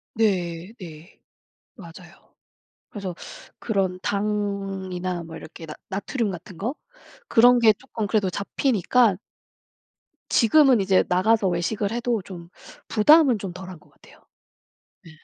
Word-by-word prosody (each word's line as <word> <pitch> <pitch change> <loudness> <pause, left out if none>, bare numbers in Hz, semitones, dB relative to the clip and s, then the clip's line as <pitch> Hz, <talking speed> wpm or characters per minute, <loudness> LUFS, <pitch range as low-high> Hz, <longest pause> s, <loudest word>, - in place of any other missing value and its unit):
네. 185 -4 -1
네. 165 -2 -12 0.6
맞아요. 175 -2 -15 0.6
그래서 195 -4 -6 0.4
그런 190 -4 -1
당이나 195 -3 -3
뭐 165 0 -9
이렇게 160 +1 -11
나 155 - -8 0.2
나트륨 210 +4 -2
같은 175 +1 -10
거? 235 - -3 0.5
그런 245 +2 +5
게 225 -2 +6
쪼끔 220 -1 -6
그래도 205 -3 +1
잡히니까 215 +2 +1 1.2
지금은 255 0 +5
이제 190 -1 +3
나가서 195 +3 +2
외식을 195 +4 -1
해도 235 -2 -1
좀 175 -3 -10 0.4
부담은 260 +2 +5
좀 190 -3 -6
덜한 180 -2 -10
것 - - -24
같아요. - - -21 0.9
네 165 - -13
195 Hz, 240 characters per minute, -23 LUFS, 180-225 Hz, 1.2 s, 게